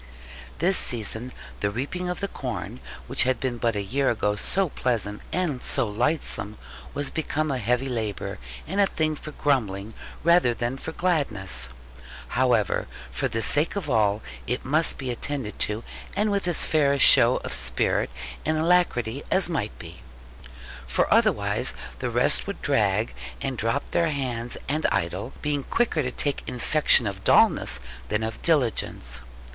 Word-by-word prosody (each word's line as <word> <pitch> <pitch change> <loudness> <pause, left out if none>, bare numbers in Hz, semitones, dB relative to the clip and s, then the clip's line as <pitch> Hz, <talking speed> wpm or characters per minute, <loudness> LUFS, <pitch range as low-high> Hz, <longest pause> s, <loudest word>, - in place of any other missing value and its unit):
This 180 +3 +2
season, 120 +1 -1 0.3
the 100 - +1
reaping 145 - -3
of 180 - -3
the 200 - 0
corn, 125 - -5 0.3
which - - +1
had 130 -2 +2
been 125 -3 -2
but 115 -2 +1
a 100 - -1
year 135 +7 +1
ago 105 -2 +1
so 185 - +1
pleasant 110 -7 -1
and 160 -8 -1
so 130 -4 0
lightsome, 110 -1 -2 0.4
was 145 0 0
become 155 -1 -1
a 130 - -1
heavy 125 +4 +1
labour, 110 -6 -3 0.3
and 195 +5 0
a 200 - +5
thing 155 -3 0
for 155 - -8
grumbling 110 -9 0 0.3
rather 170 -8 +4
than 120 +2 -2
for 160 - -5
gladness. 110 - 0 0.6
However, 120 -5 +2 0.2
for - - -1
the 115 0 -2
sake 150 +6 +2
of 170 -8 -3
all, 105 -2 +2 0.2
it 125 +2 -2
must 155 +5 +2
be 130 -2 -3
attended 125 -2 -4
to, 105 +2 -1 0.3
and 210 +2 +1
with 200 -2 0
as 175 - +2
fair 145 -3 +3
a - - +1
show - - +7
of - - -3
spirit 60 -1 0 0.3
and 155 0 +1
alacrity 155 -8 +2
as 190 -2 +3
might 105 -10 -2
be. 85 +1 -11 0.9
For - - +2
otherwise 100 +5 +2 0.2
the 125 - -2
rest 120 +9 +3
would 200 - -6
drag, 110 -6 +2 0.3
and 135 -1 -2
drop 115 +5 -1
their 170 -1 +2
hands 125 -5 -2
and 155 +3 +1
idle, 90 +8 -2
being 145 -1 0
quicker 215 - +1
to 125 - -1
take 145 +2 -1
infection 125 0 +4
of 95 -2 -4
dullness - - +4 0.3
than 105 +1 0
of 110 0 -4
diligence. 115 - 0
125 Hz, 160 wpm, -25 LUFS, 110-155 Hz, 0.9 s, show